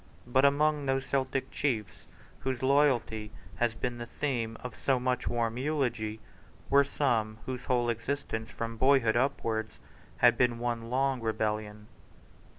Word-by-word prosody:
But 130 +3 +3
among 145 0 +3
those 135 0 +1
Celtic 135 -1 -1
chiefs 115 -8 -2 0.3
whose 130 -1 -3
loyalty 130 -6 +2 0.3
has 120 -2 +1
been 120 +1 -3
the 120 - -5
theme 120 -6 -2
of 125 -2 -6
so 135 -2 +1
much 125 0 -1
warm 115 0 -1
eulogy 120 -7 -1 0.5
were 140 +1 +7
some 115 -6 0
whose 125 -1 -5
whole 120 -1 +1
existence 115 -1 -3
from 115 0 -5
boyhood 130 -3 +4
upwards 115 -4 -1 0.4
had 120 -1 +5
been 125 -2 +3
one 115 -1 -3
long 130 0 +1
rebellion. 105 -1 -2
120 Hz, 140 wpm, -30 LUFS, 115-135 Hz, 0.5 s, were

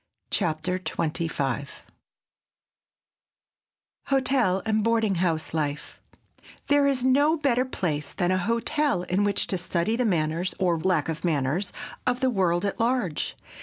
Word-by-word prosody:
CHAPTER 165 +4 0
XXV 155 -6 -2 2.4
HOTEL 260 -8 +2
AND 215 -1 +1
BOARDING 225 -3 +2
HOUSE 160 -4 -1
LIFE 150 -2 -3 0.7
THERE 285 -1 +4
is 265 -3 +1
no 285 +5 +4
better 260 -4 +2
place 155 - -2
than 175 0 0
a 185 - +2
hotel 230 - 0
in 180 +3 0
which 205 0 +1
to 185 - -2
study 180 +4 0
the 250 - +1
manners, 170 -3 0
or 175 -3 +1
lack 175 -3 +1
of 165 -1 -4
manners, 155 +2 0 0.4
of 245 0 +1
the 260 0 +2
world 180 -3 +1
at 200 - -2
large. 230 - 0
185 Hz, 130 wpm, -26 LUFS, 165-240 Hz, 2.4 s, THERE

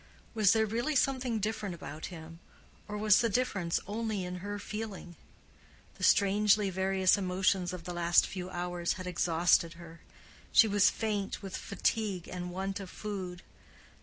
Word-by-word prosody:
Was 215 -3 +4
there 220 -1 +3
really 235 +8 -1
something 260 -3 +1
different 205 -3 -3
about 155 -2 -7
him, 165 -2 -10 0.5
or 210 0 -5
was 210 -1 +5
the 230 - +1
difference 200 -7 0
only 215 -2 -3
in 180 0 -5
her 205 +3 -5
feeling? 205 -4 -6 0.8
The - - -6
strangely 205 0 +4
various 190 +1 +2
emotions 185 -1 +1
of 180 -2 -7
the 175 - -5
last 175 0 +4
few 185 -1 -6
hours 175 -1 -2
had 185 -1 -7
exhausted 170 -1 +2
her; 170 -1 -13 0.5
she 225 - +7
was 205 -1 +4
faint 210 -2 -3
with 195 -1 -6
fatigue 200 -2 -2
and 180 -1 -5
want 195 +2 -3
of 195 -2 -8
food. 185 -4 -6
195 Hz, 155 wpm, -31 LUFS, 180-210 Hz, 0.8 s, she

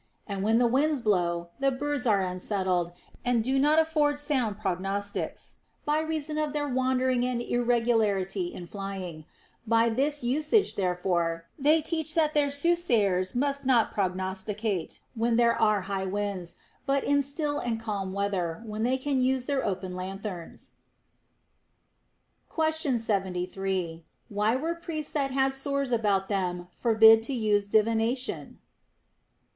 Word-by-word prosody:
And 200 -2 -4
when 220 +3 +3
the 245 - +4
winds 280 +5 +2
blow, 175 -6 0
the 275 0 +3
birds 280 0 -2
are 205 -3 +3
unsettled 185 -1 -1 0.3
and 245 -2 +1
do 265 +3 +1
not 300 +3 +4
afford 310 -2 +2
sound 260 -8 -1
prognostics, 195 0 -3 0.3
by 300 +1 +2
reason 310 -1 -3
of 305 -1 -1
their 295 -1 -1
wandering 260 -1 +1
and 250 -1 -1
irregularity 225 -6 +1
in 175 - -8
flying; 185 -4 -6 0.4
by 230 +1 +4
this 280 +4 0
usage 300 - +2
therefore 175 -3 -1
they 305 +3 +4
teach 320 -1 -1
that 310 -2 +2
their 290 -1 +2
soothsayers 245 - +1
must 280 +2 0
not 255 -4 +3
prognosticate 190 +1 -2
when 230 0 +1
there 235 0 +4
are 215 -2 +2
high 190 0 -3
winds, 195 -3 -3 0.3
but 275 0 +2
in 285 0 +3
still 290 +1 -2
and 230 -2 -2
calm 205 -4 -3
weather, 195 -2 -2
when 215 0 -5
they 250 +3 +2
can 265 0 0
use 255 0 +1
their 280 -1 0
open 185 -1 -3
lanthorns. 185 -1 -6 1.8
Question 315 -5 +1
73. 190 -4 -2 0.3
Why 210 +3 +1
were 320 +6 -1
priests 330 -3 -5
that 280 -3 0
had 270 0 +1
sores 275 -1 -1
about 205 -5 +1
them 180 -3 -2
forbid 225 0 +6
to 260 +4 -4
use 210 -3 +1
divination. 225 +4 0
225 Hz, 140 wpm, -27 LUFS, 195-275 Hz, 1.8 s, forbid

